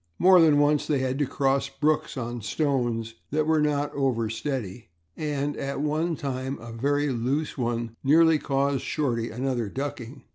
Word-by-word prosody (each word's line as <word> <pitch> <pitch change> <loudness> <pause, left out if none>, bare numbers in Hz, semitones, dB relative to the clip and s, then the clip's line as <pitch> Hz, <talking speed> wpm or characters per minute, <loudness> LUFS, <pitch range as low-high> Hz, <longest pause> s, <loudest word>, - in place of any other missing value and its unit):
More 185 -1 +7
than 155 -3 +5
once 145 0 +2
they 150 - +2
had 130 +1 -1
to 145 - +1
cross 135 0 0
brooks 150 +1 0
on 120 -1 -4
stones 120 -2 -1 0.2
that 155 +1 0
were 160 -1 +3
not 145 -1 0
over 120 -6 0
steady 115 - -4 0.3
and, 145 -1 -2
at 140 0 -4
one 155 +3 0
time, 135 -1 -4
a 115 0 -10
very 145 +5 0
loose 135 +5 -1
one 115 -2 -2
nearly 160 +2 +5
caused 140 -2 0
Shorty 120 -6 -1
another 120 -2 -2
ducking. 135 0 -6
135 Hz, 160 wpm, -26 LUFS, 120-150 Hz, 0.3 s, More